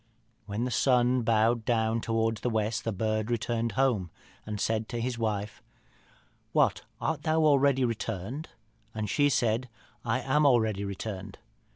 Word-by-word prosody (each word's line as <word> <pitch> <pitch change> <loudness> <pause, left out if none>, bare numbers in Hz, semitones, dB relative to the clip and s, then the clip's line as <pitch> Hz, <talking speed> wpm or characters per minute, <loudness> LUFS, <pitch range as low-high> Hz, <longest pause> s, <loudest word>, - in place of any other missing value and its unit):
When 105 +3 -2
the 125 - -2
sun 125 +1 +3
bowed 115 +1 +2
down 115 -1 +1
towards 115 -1 0
the 125 - 0
west 110 -1 -1
the 115 - 0
bird 110 +2 -1
returned 115 0 -1
home, 125 -10 +1 0.4
and 105 -1 -4
said 110 +1 -1
to 120 - -3
his 120 0 -2
wife, 105 -2 -2 0.9
'What, - - +3 0.2
art - - -1
thou 160 0 +1
already 140 -3 +4
returned?' 115 - -4 0.5
and 110 -1 -2
she 145 +7 +3
said, 120 -1 +1 0.3
'I 120 +2 0
am 140 +4 +2
already 110 -6 +2
returned.' 100 0 -6
115 Hz, 150 wpm, -29 LUFS, 110-125 Hz, 0.9 s, already